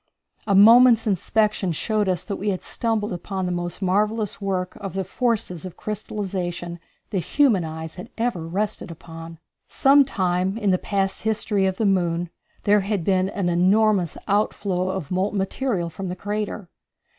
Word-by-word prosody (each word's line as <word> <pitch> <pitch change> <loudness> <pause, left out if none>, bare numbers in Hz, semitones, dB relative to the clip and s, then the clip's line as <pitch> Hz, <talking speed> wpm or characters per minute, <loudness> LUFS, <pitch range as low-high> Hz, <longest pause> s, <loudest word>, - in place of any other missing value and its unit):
A 200 - +3
moment's 230 +3 +7
inspection 210 -1 +1
showed 210 +5 0
that 190 +2 -2
we 205 - -2
had 185 -2 -2
stumbled 220 -4 -1
upon 190 +2 -4
the 180 - -1
most 175 +2 -3
marvellous 210 +2 0
work 185 -2 -2
of 195 -2 -7
the 195 - -1
forces 200 -4 -1
of 185 -2 -8
crystallization 185 -5 -4 0.3
that 195 - 0
human 205 - +2
eyes 160 0 -6
had - - -11
ever 225 -9 -1
rested 200 +3 -3
upon. 165 0 -10 0.3
Some 280 +1 +5
time 185 -5 -1
in 210 -4 +1
the 185 - +2
past 195 -2 -1
history 210 -2 +1
of 190 0 -2
the 220 - 0
moon 175 -3 +1 0.3
there 205 0 +4
had 200 -2 -2
been 190 +1 +2
an 195 -3 -2
enormous 185 +1 +3
outflow 195 -2 0
of 185 -5 -4
molten 190 +3 0
material 195 -3 -1
from 190 +3 -6
the 180 - -4
crater. 205 0 -4
195 Hz, 160 wpm, -23 LUFS, 180-210 Hz, 0.3 s, moment's